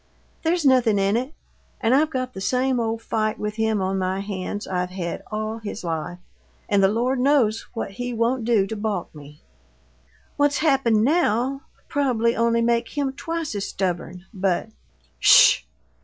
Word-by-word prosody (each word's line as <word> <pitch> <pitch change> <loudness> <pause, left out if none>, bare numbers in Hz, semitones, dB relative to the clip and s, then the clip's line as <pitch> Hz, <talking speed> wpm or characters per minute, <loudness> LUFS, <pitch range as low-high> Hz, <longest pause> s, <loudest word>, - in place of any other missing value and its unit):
There's 335 -1 0
nothin' 250 -6 +4
in 195 +1 +2
it 255 +4 -2 0.5
and 230 0 +2
I've 300 +3 +3
got 255 -3 -3
the 190 - -7
same 255 +4 +1
old 225 0 -2
fight 215 -1 -1
with 210 +1 -4
him 220 -3 +1
on 190 +1 -1
my 190 +1 -1
hands 200 0 -5
I've 180 -1 -2
had 180 -2 -5
all 215 +1 -3
his 215 -1 -7
life 165 +1 -3 0.5
and 200 -1 +2
the 195 - +5
Lord 245 +6 0
knows 250 -5 +2
what 225 - -4
he 245 +5 -5
won't 235 +1 0
do 220 -4 +2
to 220 - -5
balk 205 -4 -3
me! 150 -1 -14 0.9
What's 290 0 +2
happened 265 -8 +2
now'll 270 -2 +1 0.3
probably 240 -5 +1
only 230 0 +2
make 235 0 +1
him 275 -2 0
twice 330 0 -4
as 200 -1 -3
stubborn, 180 -1 -3
but 195 +1 -1 0.3
" - - -38
"SH!" - - +7
225 Hz, 170 wpm, -23 LUFS, 195-255 Hz, 0.9 s, SH